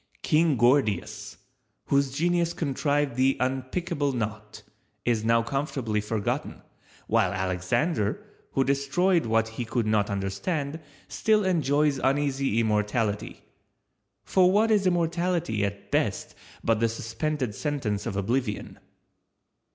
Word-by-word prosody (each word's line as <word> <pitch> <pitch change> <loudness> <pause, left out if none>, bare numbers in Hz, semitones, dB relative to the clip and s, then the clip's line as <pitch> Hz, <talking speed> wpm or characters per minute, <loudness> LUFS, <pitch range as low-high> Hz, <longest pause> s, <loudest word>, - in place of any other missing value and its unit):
King 155 -2 +3
Gordius, 120 -6 +1 0.5
whose 140 0 +2
genius 170 +3 +1
contrived 145 -2 -1
the 135 +1 +3
unpickable 135 +2 -1
knot, 110 -2 -5 0.4
is 115 -3 +1
now 115 +1 +3
comfortably 125 -4 -2
forgotten, 105 0 -3 0.4
while - - +2
Alexander 95 - -1 0.3
who 135 - +3
destroyed 140 +5 +1
what 115 0 +2
he 115 +2 -5
could 115 0 -1
not 110 -1 +1
understand, 140 - -2 0.3
still 215 -2 +2
enjoys 150 -5 +2
uneasy 135 -3 +1
immortality; 105 -1 -1 0.8
for 185 -1 +4
what 220 +3 +3
is 200 -3 +3
immortality 170 - 0
at 100 0 -4
best - - 0 0.3
but 115 -1 +2
the 115 0 +2
suspended 115 +2 -3
sentence 110 -7 -2
of - - -3
Oblivion? 105 +2 -2
130 Hz, 110 wpm, -26 LUFS, 110-155 Hz, 0.8 s, for